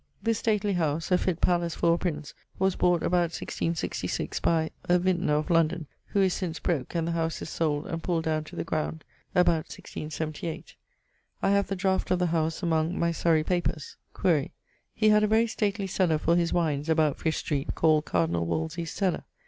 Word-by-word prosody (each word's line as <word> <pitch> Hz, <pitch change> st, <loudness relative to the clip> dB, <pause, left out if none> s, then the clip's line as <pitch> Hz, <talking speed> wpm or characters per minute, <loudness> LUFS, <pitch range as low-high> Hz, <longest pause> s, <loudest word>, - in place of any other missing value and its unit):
This 225 Hz, -2 st, +1 dB
stately 210 Hz, -2 st, +1 dB
house 160 Hz, -1 st, -1 dB
(a 180 Hz, -, +6 dB
fitt 180 Hz, -3 st, -1 dB
pallace 170 Hz, -2 st, +1 dB
for 170 Hz, -, +3 dB
a -, -, +1 dB
prince) 155 Hz, -5 st, -3 dB, 0.2 s
was 190 Hz, 0 st, +1 dB
bought 175 Hz, -1 st, +2 dB
about 175 Hz, -1 st, +1 dB
1666, 165 Hz, 0 st, -2 dB
by... 160 Hz, -1 st, +1 dB
a 180 Hz, -, +4 dB
vintner, 180 Hz, -4 st, +1 dB
of 150 Hz, +3 st, -1 dB
London, 165 Hz, 0 st, +2 dB, 0.2 s
who 200 Hz, -, +1 dB
is 185 Hz, -1 st, +2 dB
since 175 Hz, -4 st, -3 dB
broke, 155 Hz, -4 st, -2 dB
and 165 Hz, -1 st, 0 dB
the -, -, 0 dB
house 165 Hz, -1 st, -1 dB
is -, -, -7 dB
sold, 150 Hz, -2 st, 0 dB
and 165 Hz, 0 st, -4 dB
pulled 165 Hz, -1 st, -1 dB
downe 155 Hz, -1 st, 0 dB
to -, -, -11 dB
the -, -, -2 dB
ground, 155 Hz, -1 st, -3 dB, 0.3 s
about 175 Hz, -3 st, +3 dB
1678. 155 Hz, +1 st, -6 dB, 0.7 s
I -, -, +3 dB
have 200 Hz, 0 st, +2 dB
the 195 Hz, -, -2 dB
draught 190 Hz, 0 st, 0 dB
of 185 Hz, -, +3 dB
the 180 Hz, -, +1 dB
house 160 Hz, +2 st, 0 dB
among 165 Hz, +1 st, +1 dB
my 170 Hz, 0 st, +1 dB
Surrey 165 Hz, -1 st, +2 dB
papers. 175 Hz, -4 st, -2 dB, 0.2 s
Quaere: 160 Hz, -7 st, +2 dB, 0.5 s
he 215 Hz, -1 st, +3 dB
had 210 Hz, 0 st, +5 dB
a -, -, +4 dB
very 220 Hz, +2 st, +4 dB
stately 205 Hz, -2 st, -1 dB
cellar 180 Hz, -4 st, +1 dB
for 165 Hz, +2 st, +2 dB
his 170 Hz, -1 st, +1 dB
wines, 155 Hz, -3 st, 0 dB
about 155 Hz, -3 st, +2 dB
Fish 160 Hz, -1 st, 0 dB
street, 145 Hz, -2 st, -2 dB
called 155 Hz, -2 st, +3 dB
Cardinall 85 Hz, -1 st, 0 dB
Wolsey's 160 Hz, -, -2 dB
cellar. 190 Hz, -4 st, -1 dB
170 Hz, 195 wpm, -27 LUFS, 155-180 Hz, 0.7 s, a